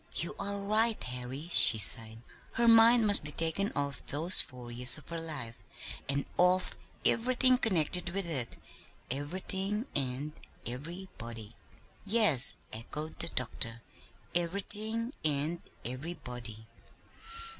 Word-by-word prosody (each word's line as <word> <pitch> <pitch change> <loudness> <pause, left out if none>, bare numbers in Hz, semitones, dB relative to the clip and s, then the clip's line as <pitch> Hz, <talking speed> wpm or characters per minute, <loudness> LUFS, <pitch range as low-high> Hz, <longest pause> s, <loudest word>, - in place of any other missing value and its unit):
"You 170 - -5
are 200 0 -5
right, 215 +3 -1
Harry," 125 +5 -8
she 115 - +8
sighed. 110 +1 +4 0.3
"Her 235 0 -1
mind 230 0 +5
must 205 -5 +2
be 150 - -7
taken 165 +6 0
off 140 0 -5
those 165 +6 +6
four 125 -2 -13
years 125 +1 +6
of 150 - -16
her 165 -1 -6
life, 150 -8 -8 0.5
and 140 0 -2
off 180 +1 0 0.3
everything 255 +1 +3
connected 180 - 0
with 195 +1 -5
it; 135 -8 -3 0.6
everything 190 - -2
and 135 +2 -4 0.3
everybody." 120 - -10 0.5
"Yes," 205 - +5 0.2
echoed 150 +8 -8
the 165 - 0
doctor; 115 -3 -3 0.5
"everything 210 +7 +1
and 155 +3 -2 0.2
everybody. 125 -5 -7
160 Hz, 115 wpm, -29 LUFS, 125-200 Hz, 0.6 s, she